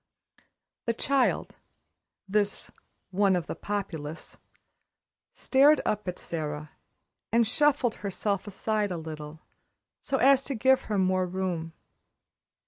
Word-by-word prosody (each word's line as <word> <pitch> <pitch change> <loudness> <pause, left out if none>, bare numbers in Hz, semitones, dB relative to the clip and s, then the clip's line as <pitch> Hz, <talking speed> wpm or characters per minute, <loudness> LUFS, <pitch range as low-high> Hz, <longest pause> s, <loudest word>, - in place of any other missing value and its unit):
The 230 - +1
child 270 +1 +1 0.7
this 205 0 -1 0.4
"one 195 0 +3
of 175 -3 -1
the - - -4
Populace" 165 -7 -5 1.0
stared 285 +3 +4
up 210 -2 -1
at 180 - -3
Sara, 150 -2 -5 0.6
and 230 0 +4
shuffled 255 -1 +2
herself 200 0 -2
aside 210 +1 -1
a 180 - -3
little, 155 -1 -8 0.6
so 270 - -1
as 270 +1 +5
to 275 - -3
give 260 +3 +3
her 210 - -1
more 185 -1 +2
room. 175 -3 -3
200 Hz, 115 wpm, -28 LUFS, 170-230 Hz, 1.0 s, as